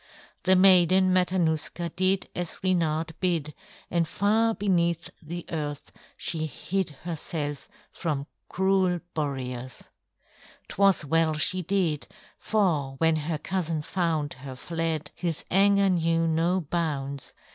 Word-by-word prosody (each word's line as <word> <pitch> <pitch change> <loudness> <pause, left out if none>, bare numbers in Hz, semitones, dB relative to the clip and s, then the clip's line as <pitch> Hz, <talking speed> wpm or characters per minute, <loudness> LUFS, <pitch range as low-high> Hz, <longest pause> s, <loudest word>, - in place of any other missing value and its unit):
The 190 0 +6
Maiden 185 0 +6
Matanuska 175 -2 +1
did 185 +1 +2
as 175 -2 -4
Reynard 165 -3 +1
bid, 165 -5 0 0.4
and 170 -2 +1
far 220 +5 +2
beneath 170 -4 0
the 170 +2 -6
earth 145 -3 -4 0.3
she 160 -2 -2
hid 185 +6 -2
herself 155 -3 -4 0.2
from 150 -5 -3 0.2
cruel 190 -2 +1
Boreas. 130 -4 -4 0.8
'Twas 195 -5 +3
well 160 +1 +2
she 185 +4 +2
did, 170 -8 0 0.3
for 160 -11 0
when 160 +1 +3
her 155 +1 -2
cousin 165 -2 -2
found 160 -4 -1
her 135 -1 -7
fled, 165 +2 -3
his 170 -3 -3
anger 200 +1 +5
knew 165 -1 +2
no 165 +3 +2
bounds. 140 -4 -3
165 Hz, 115 wpm, -27 LUFS, 155-185 Hz, 0.8 s, The